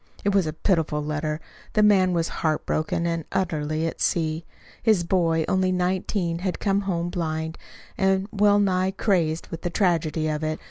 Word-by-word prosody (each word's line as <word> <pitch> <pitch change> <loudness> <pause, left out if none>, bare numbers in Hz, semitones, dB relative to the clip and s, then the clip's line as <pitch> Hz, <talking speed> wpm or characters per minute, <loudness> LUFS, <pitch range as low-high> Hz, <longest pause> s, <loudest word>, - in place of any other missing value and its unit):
It 200 - +2
was 195 -5 +3
a 155 - -2
pitiful 160 -4 0
letter. 150 0 -2 0.3
The 215 - +4
man 190 -3 +5
was 170 -1 +1
heart 155 -2 0
broken 155 +2 -1
and 165 -1 -1
utterly 160 -4 -1
at 165 - -4
sea. 160 -1 0 0.4
His 215 -6 +3
boy 165 -3 +1
only 185 0 +2
nineteen 180 -1 -1
had 185 0 -2
come 200 -1 +1
home 175 -3 -2
blind, 160 -2 -2 0.4
and 190 0 +2
well 205 0 +4
nigh 190 -2 +2
crazed 175 -5 0
with 165 - -6
the 175 - -2
tragedy 165 -4 +1
of 155 0 -2
it. 155 0 -2
170 Hz, 175 wpm, -24 LUFS, 160-190 Hz, 0.4 s, man